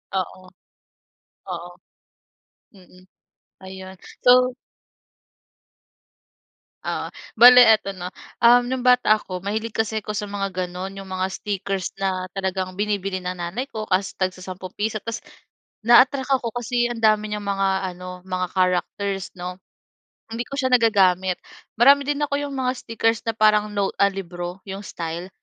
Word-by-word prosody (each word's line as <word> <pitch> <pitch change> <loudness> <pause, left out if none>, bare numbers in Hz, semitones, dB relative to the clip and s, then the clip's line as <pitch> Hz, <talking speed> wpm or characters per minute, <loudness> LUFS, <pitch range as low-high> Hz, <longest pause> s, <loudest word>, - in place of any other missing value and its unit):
Oo, 185 0 -4 1.0
oo. 175 0 -5 1.1
Mm. 185 -1 -19 0.6
Ayun 190 0 -9 0.3
so 250 0 +5 2.3
Oo - - -3 0.2
bale 245 +2 +9
eto 220 -3 +4
'no. 180 0 -6 0.3
Um 245 +1 +5
no'ng 255 -1 -3
bata 250 -4 +5
ako, 185 -3 -7
mahilig 215 +3 -3
kasi 220 0 -1
ako 210 +1 -5
sa 210 0 -4
mga 195 -1 -3
ganun 180 +2 -6
yung 195 -1 -9
mga 185 0 -1
stickers 195 -2 -3
na 185 -1 -2
talagang 185 -1 -2
binibili 200 -2 -1
ng 180 0 -4
nanay 175 +9 -3
ko, 215 -1 -6
kaso 190 +1 +1
tagsasampung 185 0 -4
piso. 215 0 -2
Tas 230 +2 -5 0.6
na-attract 255 +4 +5
ako 235 -4 -1
kasi 240 0 0
ang 230 -1 -6
dami 215 -1 +3
niyang 210 -1 -4
mga 195 -1 +1 0.2
ano 180 0 -9
mga 185 -1 -2
characters 190 +1 -1
'no, 180 +1 -6 0.7
hindi 230 +1 -3
ko - - -11
siya 260 -2 +1
nagagamit. 190 -6 +3 0.4
Marami 280 +4 +7
din 290 0 -1
ako 290 -1 -1
'yong 290 -1 -4
mga 255 -1 0
stickers 225 -1 -1
na 225 - +1
parang 215 -1 +3
note 200 -1 -1
a 200 - +6
libro 175 -1 -6
'yong 195 +1 -6
style 170 +1 -5
200 Hz, 140 wpm, -23 LUFS, 185-230 Hz, 2.3 s, bale